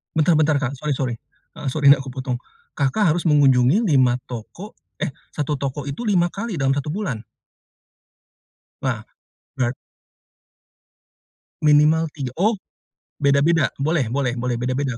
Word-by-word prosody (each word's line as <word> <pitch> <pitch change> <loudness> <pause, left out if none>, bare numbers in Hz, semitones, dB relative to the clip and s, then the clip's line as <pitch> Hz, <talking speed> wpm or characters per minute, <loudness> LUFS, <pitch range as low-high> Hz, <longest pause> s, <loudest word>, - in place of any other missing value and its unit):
Bentar 160 +2 +4
bentar 155 -1 +3
Kak, 135 -1 -2
sori 150 +3 -3
sori 130 -3 -2 0.4
heeh, - - -6
sori 150 0 +1
nih 140 - +6
aku 135 -1 -7
potong. 130 -1 -3 0.4
Kakak 155 +6 +2
harus 175 - -2
mengunjungi 140 - +4
5 130 -6 +4
toko 125 - -8 0.2
eh, - - -1 0.2
1 150 0 -2
toko 140 0 -4
itu 140 +11 -5
5 185 -6 +2
kali 205 -5 -4
dalam 135 0 +2
1 145 +1 -3
bulan? 150 - -3 1.6
Lah, 115 -5 -2 0.5
berat 125 -1 0 1.9
Minimal 155 +2 +4
3 130 -3 -4
oh, 215 +2 +3 0.6
beda-beda? 140 +2 +3
Boleh 140 -3 0
boleh 130 0 0
boleh, 120 0 -2
beda-beda? 130 +1 -2
140 Hz, 135 wpm, -22 LUFS, 130-155 Hz, 1.9 s, nih